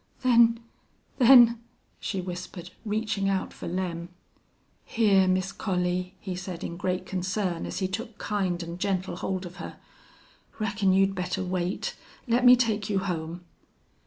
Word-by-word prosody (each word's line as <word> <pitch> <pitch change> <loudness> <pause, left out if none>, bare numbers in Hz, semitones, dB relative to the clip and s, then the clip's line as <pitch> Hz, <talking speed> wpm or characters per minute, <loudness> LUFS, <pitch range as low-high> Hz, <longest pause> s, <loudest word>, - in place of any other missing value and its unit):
"Then 235 -2 +5 0.6
then 240 -2 +8 0.2
" - - -42
she 195 -3 -3
whispered, 180 0 -7
reaching 210 -2 -1
out 190 -1 -1
for - - -8
Lem. 175 -1 -3 0.8
"Hyar, 200 -4 +4
Miss 185 +1 +1
Collie," 180 -1 -2
he 185 -2 -5
said, 180 -1 -6
in 170 - -4
great 180 +1 -2
concern, 185 -1 -2
as - - -5
he 190 - 0
took 220 +3 -5
kind 185 -4 -1
and 170 +1 -7
gentle 190 -1 -1
hold 190 -1 -3
of 180 +2 -10
her. - - -8 0.8
"Reckon 205 -2 +1
you'd 195 +1 +3
better 185 0 -2
wait. 180 0 -2 0.3
Let 240 +2 +2
me 250 0 +10
take 220 -4 0
you 200 - +1
home." 175 -3 -3
190 Hz, 150 wpm, -27 LUFS, 180-210 Hz, 0.8 s, me